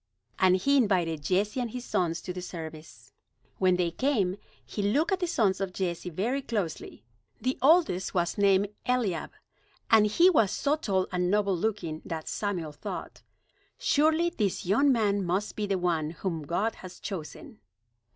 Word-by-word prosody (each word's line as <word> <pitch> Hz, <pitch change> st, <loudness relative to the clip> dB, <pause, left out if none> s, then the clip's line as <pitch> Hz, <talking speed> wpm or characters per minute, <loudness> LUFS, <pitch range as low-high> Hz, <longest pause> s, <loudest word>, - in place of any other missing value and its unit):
And 185 Hz, -1 st, +5 dB
he 280 Hz, +9 st, +3 dB
invited 180 Hz, -, +1 dB
Jesse 200 Hz, -, 0 dB
and 245 Hz, -2 st, -2 dB
his 250 Hz, +2 st, -6 dB
sons 170 Hz, -2 st, -1 dB
to 180 Hz, -, -5 dB
the 180 Hz, -, -6 dB
service. 160 Hz, -3 st, -9 dB, 0.5 s
When 185 Hz, -1 st, +4 dB
they 175 Hz, -2 st, 0 dB
came, 200 Hz, -, 0 dB, 0.3 s
he 210 Hz, -, -4 dB
looked 275 Hz, -, +1 dB
at 380 Hz, -, +1 dB
the 355 Hz, -, -1 dB
sons 205 Hz, -, +1 dB
of 190 Hz, -2 st, -2 dB
Jesse 180 Hz, -2 st, -3 dB
very 230 Hz, -, -1 dB
closely. 205 Hz, -, -4 dB, 0.4 s
The 255 Hz, +1 st, -2 dB
oldest 275 Hz, -, +3 dB
was 175 Hz, -1 st, +1 dB
named 200 Hz, -1 st, +3 dB, 0.2 s
Eliab, 235 Hz, -9 st, 0 dB, 0.6 s
and 215 Hz, -2 st, +6 dB
he 335 Hz, -, +5 dB
was 225 Hz, -, +4 dB
so 285 Hz, +8 st, +1 dB
tall 195 Hz, -11 st, 0 dB
and 180 Hz, -1 st, 0 dB
noble 200 Hz, -1 st, +2 dB
looking 175 Hz, -5 st, -2 dB
that 160 Hz, -1 st, -5 dB
Samuel 180 Hz, -7 st, -3 dB
thought: 150 Hz, -, -7 dB, 0.6 s
"Surely 315 Hz, +4 st, +2 dB
this 210 Hz, -, -1 dB
young 270 Hz, +10 st, +4 dB
man 205 Hz, -5 st, +1 dB
must 185 Hz, +4 st, -1 dB
be 210 Hz, -1 st, -2 dB
the 195 Hz, -1 st, 0 dB
one 170 Hz, -4 st, 0 dB
whom 165 Hz, -3 st, -4 dB
God 205 Hz, +7 st, 0 dB
has 185 Hz, -1 st, -10 dB
chosen." 210 Hz, -, -7 dB
195 Hz, 165 wpm, -28 LUFS, 180-235 Hz, 0.6 s, and